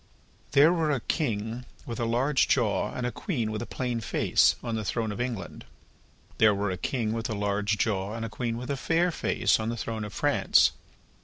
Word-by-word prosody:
There 145 +4 +6
were 165 -3 +1
a 140 -4 +1
king 115 -3 -2 0.2
with 115 -2 -5
a 120 - 0
large 130 +4 +2
jaw 115 -6 +1
and 125 - -4
a 125 - -1
queen 120 - -2
with 110 - -3
a 120 - -5
plain 125 -2 -2
face, - - +3
on 120 -2 -3
the 110 -1 -2
throne 110 +1 -1
of 105 - -4
England; 120 -6 -4 0.8
there 105 -2 +5
were 100 0 -1
a - - -2
king 115 -2 -1
with 115 0 -3
a 110 - -2
large 105 +1 0
jaw 100 -1 -1
and 115 0 -3
a - - -3
queen 115 +1 -3
with 125 +3 -5
a 140 - -1
fair 170 +5 +1
face, - - +1
on 110 +1 -2
the 120 - -3
throne 110 -1 -4
of 105 - -6
France. - - +3
115 Hz, 215 wpm, -27 LUFS, 110-125 Hz, 0.8 s, There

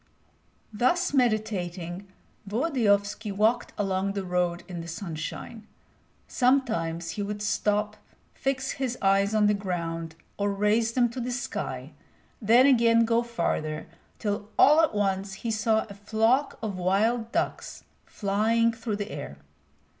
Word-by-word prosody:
Thus 280 - +1
meditating, 200 -7 -1 0.4
Volodyovski 210 -5 +1
walked 215 +4 +1
along 195 -1 0
the 200 -1 -3
road 180 -1 -1
in 175 -2 -6
the 165 - -8
sunshine. 175 +5 -6 0.6
Sometimes 225 - +1
he 210 - -4
would 205 +1 -4
stop, 210 0 0 0.4
fix 270 0 -2
his 255 -2 -3
eyes 195 +2 +2
on 215 -1 +4
the 210 - +4
ground 165 -4 -4 0.2
or 200 0 +1
raise 210 +3 +1
them 245 -1 +3
to 245 +3 -7
the 245 - -3
sky, 155 - -4 0.5
then 235 +4 +6
again 230 -3 +5
go 230 +1 +2
farther, 165 -9 -2 0.3
till 205 0 -3
all 300 +3 +7
at 315 -9 +1
once 195 -1 0
he 230 - 0
saw 220 0 +1
a 200 - -9
flock 220 +7 +1
of 200 -4 -3
wild 220 +6 +1
ducks - - -3 0.2
flying 220 +3 +1
through 225 -1 -3
the 205 0 -5
air. 70 +2 -7
210 Hz, 135 wpm, -27 LUFS, 195-230 Hz, 0.6 s, all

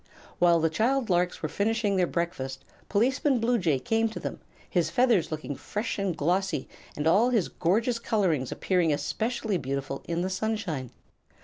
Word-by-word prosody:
While 170 -1 +5
the 165 - +3
child 235 +4 +1
larks 180 0 +1
were - - +1
finishing 210 -1 0
their 180 -2 +2
breakfast 135 -7 -3 0.2
Policeman 260 +5 +2
Bluejay 225 - +2
came 225 - +1
to 220 - -7
them, - - -5 0.3
his 170 -5 +1
feathers 235 -4 +3
looking 155 -2 -4
fresh 210 - -4
and 190 -4 -1
glossy 180 0 0 0.3
and 150 - -2
all 205 +9 +5
his 225 -8 +1
gorgeous 225 +7 +1
colorings 180 - 0
appearing 180 -4 +1
especially 185 +8 -1
beautiful 135 0 -3
in 170 +1 -1
the 185 - -1
sunshine. 185 - -2
185 Hz, 155 wpm, -27 LUFS, 160-225 Hz, 0.3 s, While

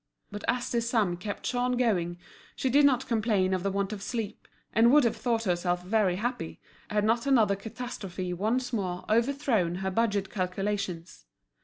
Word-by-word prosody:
But 205 0 -6
as 245 0 0
this 235 -1 0
sum 210 -8 +2
kept 200 +4 -6
Jean 250 0 0
going 190 -9 +1 0.4
she 260 - -1
did 285 +2 +6
not 265 -1 +1
complain 210 -5 +1
of 185 - 0
the 195 - 0
want 200 +1 -1
of 205 - -6
sleep, 225 -1 -4 0.3
and 230 +2 +5
would 295 0 +6
have 235 - +2
thought 230 -2 0
herself 180 -2 0
very 195 -1 +2
happy 220 -5 -3 0.3
had 210 0 +1
not 230 +4 +1
another 220 -7 +4
catastrophe 200 -4 -5
once 240 +7 -1
more 185 -5 -2
overthrown 230 -7 +2
her 190 +1 -2
budget 205 -2 0
calculations. 185 - -3
210 Hz, 170 wpm, -28 LUFS, 185-240 Hz, 0.4 s, did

